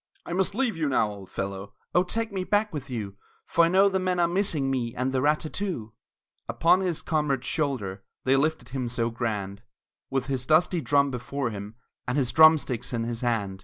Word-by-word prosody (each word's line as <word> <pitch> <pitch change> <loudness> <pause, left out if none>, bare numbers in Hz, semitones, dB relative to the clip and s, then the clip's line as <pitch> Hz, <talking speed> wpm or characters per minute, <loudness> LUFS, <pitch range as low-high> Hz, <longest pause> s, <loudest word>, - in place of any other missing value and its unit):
"I - - -5
must 190 +2 0
leave 250 -2 0
you 155 -3 -1
now, 110 -5 +2
old 100 -2 -10
fellow!" 100 0 -5 0.2
"Oh, 180 - +5
take 225 +5 -2
me 190 -2 -2
back 205 +1 +1
with 140 -2 -6
you, 105 -5 -5 0.3
For 170 - +3
I - - +3
know 190 +3 +5
the 190 -1 +1
men 185 -1 0
are 170 - +4
missing 170 -7 0
me 120 -2 -2
And 130 +1 -1
the 130 - +1
rat 150 +2 +2
tat 155 - -6
too!" 165 - -4 0.6
Upon 170 +3 +4
his 180 -4 -2
comrade's 150 -5 0
shoulder 110 - -2 0.2
They 130 +1 +3
lifted 155 +4 0
him 130 -1 -3
so 115 -1 -1
grand, 105 -4 -3 0.5
With 135 -1 -1
his 130 -2 -3
dusty 170 +2 +3
drum 140 -1 +2
before 125 0 -3
him, 105 +1 -7 0.3
And 125 +3 0
his 130 -4 +1
drumsticks 150 -7 +4
in 115 -1 -1
his 115 0 -4
hand! 105 -6 -1
135 Hz, 205 wpm, -26 LUFS, 115-170 Hz, 0.6 s, Oh